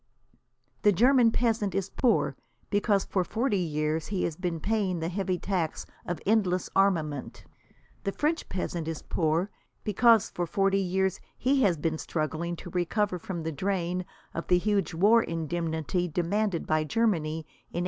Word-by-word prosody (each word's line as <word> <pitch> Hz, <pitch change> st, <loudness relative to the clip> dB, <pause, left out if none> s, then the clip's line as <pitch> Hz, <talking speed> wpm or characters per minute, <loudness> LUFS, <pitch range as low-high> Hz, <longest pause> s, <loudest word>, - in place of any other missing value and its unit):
The 210 Hz, -, +5 dB
German 245 Hz, +4 st, +5 dB
peasant 225 Hz, -5 st, 0 dB
is 195 Hz, -1 st, -1 dB
poor, 245 Hz, -3 st, +2 dB, 0.4 s
because 205 Hz, -1 st, +2 dB
for 185 Hz, -, 0 dB
forty 220 Hz, +1 st, 0 dB
years 155 Hz, -1 st, -1 dB
he 195 Hz, -3 st, -1 dB
has 165 Hz, -, -1 dB
been 175 Hz, -1 st, -3 dB
paying 200 Hz, -3 st, 0 dB
the 165 Hz, +1 st, -2 dB
heavy 185 Hz, 0 st, -1 dB
tax 175 Hz, -4 st, -2 dB, 0.2 s
of 175 Hz, -, -2 dB
endless 190 Hz, -4 st, +1 dB
armament. 160 Hz, -8 st, 0 dB, 0.6 s
The 195 Hz, -, 0 dB
French 310 Hz, +8 st, -1 dB
peasant 175 Hz, -3 st, -3 dB
is 160 Hz, -2 st, -4 dB
poor, 165 Hz, +4 st, 0 dB, 0.3 s
because 225 Hz, +1 st, +4 dB
for 175 Hz, -1 st, -2 dB
forty 195 Hz, +2 st, +2 dB
years 190 Hz, 0 st, 0 dB, 0.2 s
he 265 Hz, +2 st, +2 dB
has 190 Hz, -8 st, +3 dB
been 160 Hz, +1 st, -1 dB
struggling 165 Hz, +2 st, -2 dB
to 175 Hz, +1 st, -9 dB
recover 180 Hz, +2 st, 0 dB
from 170 Hz, -1 st, -5 dB
the 160 Hz, -, -2 dB
drain 180 Hz, +2 st, -1 dB, 0.3 s
of 165 Hz, -, -4 dB
the 180 Hz, -, +5 dB
huge 195 Hz, -3 st, 0 dB
war 210 Hz, +7 st, +5 dB
indemnity 165 Hz, 0 st, -2 dB
demanded 175 Hz, +3 st, 0 dB
by 155 Hz, 0 st, +1 dB
Germany 160 Hz, -5 st, 0 dB
in 155 Hz, -, -13 dB
1871. -, -, +1 dB
180 Hz, 160 wpm, -28 LUFS, 165-205 Hz, 0.6 s, The